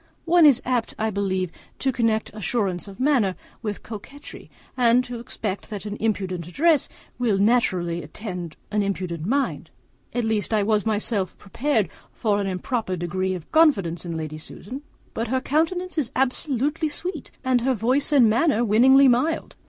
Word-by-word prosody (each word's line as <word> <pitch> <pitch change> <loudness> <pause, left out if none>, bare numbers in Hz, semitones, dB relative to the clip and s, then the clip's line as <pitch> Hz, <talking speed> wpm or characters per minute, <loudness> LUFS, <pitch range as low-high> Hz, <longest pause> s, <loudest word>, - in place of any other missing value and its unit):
One 335 -2 +6
is 270 -4 +4
apt, 245 -3 -1
I 220 0 0
believe, 190 -3 -1 0.3
to 270 - 0
connect 225 -4 0
assurance 205 -3 -2
of 195 -1 -11
manner 255 -9 +2 0.3
with 210 -2 -4
coquetry, 235 +7 -10 0.3
and 245 0 +4
to 245 -1 -6
expect 210 -4 -5
that 210 -2 -6
an 205 0 -4
impudent 190 -6 -2
address 300 - +2 0.3
will 230 -5 +2
naturally 185 -6 +2
attend 175 -1 -7 0.2
an 210 0 +1
impudent 185 -4 -3
mind; 275 +3 -1 0.4
at 245 - -1
least 220 0 0
I 210 - +2
was 215 0 +1
myself 210 -3 -1
prepared 225 0 0 0.2
for 205 -3 0
an 200 - -2
improper 190 +2 -2
degree 185 +2 -2
of 170 -3 -10
confidence 195 - +3
in 170 -2 -4
Lady 155 -1 -5
Susan; 245 - -8 0.3
but 230 +1 -2
her 260 +3 +1
countenance 330 +6 0
is 265 -4 -2
absolutely 280 +4 0
sweet, 330 +1 -5
and 255 -2 +2
her 260 +1 +1
voice 255 +7 +2
and 270 -6 +6
manner 240 +1 +3
winningly 265 +6 +6
mild. 255 +6 +1
220 Hz, 160 wpm, -24 LUFS, 195-260 Hz, 0.4 s, One